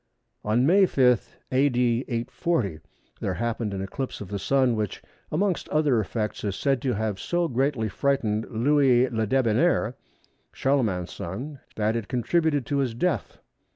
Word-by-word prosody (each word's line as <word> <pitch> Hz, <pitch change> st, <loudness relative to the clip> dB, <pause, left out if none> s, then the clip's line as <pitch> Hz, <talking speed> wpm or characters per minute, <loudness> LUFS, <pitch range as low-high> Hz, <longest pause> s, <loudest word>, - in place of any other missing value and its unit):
On 115 Hz, +4 st, +2 dB
May 190 Hz, +5 st, +5 dB
5, 125 Hz, -7 st, +2 dB
A.D. 125 Hz, -2 st, +2 dB
840, 115 Hz, -, -1 dB, 0.4 s
there -, -, -2 dB
happened 115 Hz, -2 st, -2 dB
an 95 Hz, -1 st, -3 dB
eclipse 130 Hz, +7 st, -5 dB
of 100 Hz, -, -8 dB
the 100 Hz, -1 st, -3 dB
Sun 130 Hz, +1 st, +2 dB
which, 105 Hz, -3 st, -3 dB, 0.3 s
amongst 185 Hz, +3 st, 0 dB
other 150 Hz, -6 st, +2 dB
effects, 105 Hz, +1 st, -3 dB
is 100 Hz, -2 st, -2 dB
said 135 Hz, +4 st, 0 dB
to 130 Hz, -2 st, 0 dB
have 105 Hz, -2 st, -2 dB
so 175 Hz, -, 0 dB
greatly 130 Hz, -4 st, 0 dB
frightened 110 Hz, -3 st, 0 dB
Louis 130 Hz, +1 st, +3 dB
Le 110 Hz, -2 st, 0 dB
Debonnaire 120 Hz, -3 st, +2 dB, 0.6 s
(Charlemagne's 110 Hz, -11 st, 0 dB
son) 130 Hz, -, -6 dB, 0.2 s
that 110 Hz, +1 st, 0 dB
it 115 Hz, -4 st, -3 dB
contributed 145 Hz, -, +1 dB
to 145 Hz, -, -1 dB
his 125 Hz, -4 st, -1 dB
death. 175 Hz, +6 st, -1 dB
125 Hz, 150 wpm, -26 LUFS, 110-140 Hz, 0.6 s, May